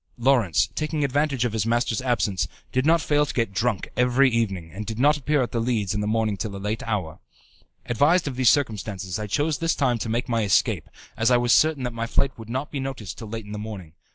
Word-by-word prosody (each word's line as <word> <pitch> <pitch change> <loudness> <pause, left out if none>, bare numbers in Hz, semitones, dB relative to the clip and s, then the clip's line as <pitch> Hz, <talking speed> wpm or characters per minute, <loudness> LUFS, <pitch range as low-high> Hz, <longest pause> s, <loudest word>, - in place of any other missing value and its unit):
Lawrence, 115 -8 +3
taking 155 -1 -2
advantage 140 -2 +1
of 120 - -2
his 110 -3 0
masters' 120 0 +1
absence, 120 -7 0 0.2
did 130 +3 +1
not 165 0 +4
fail 150 0 +2
to 150 - -4
get 115 -5 0
drunk 110 -1 0
every 125 +2 +3
evening, 95 -8 -1
and 105 +3 -6
did 110 -1 -4
not 145 +4 +4
appear 150 -1 +1
at 120 - -4
The 115 - -1
Leads 115 -4 0
in 105 - -1
the 105 - -2
morning 110 -2 0
till 100 0 -4
a - - -5
late 105 +3 -3
hour. 95 -8 -3 0.7
Advised 150 +9 +3
of 135 - -3
these 125 -3 +4
circumstances, 105 -8 -1
I 105 - -4
chose 145 +8 0
this 165 0 +1
time 125 -5 +1
to 115 - -3
make 120 +2 -1
my 115 -2 0
escape, 100 -3 +1 0.3
as 115 +1 +2
I 125 - +5
was 120 0 +3
certain 155 -4 +3
that 125 -1 -3
my 115 0 -3
flight 135 +2 0
would 115 0 -10
not 130 +4 -3
be 145 - -3
noticed 130 -8 -5
till 110 - -8
late 115 -1 -5
in 105 - -10
the 105 - -5
morning. 100 -7 -8
115 Hz, 240 wpm, -24 LUFS, 105-135 Hz, 0.7 s, I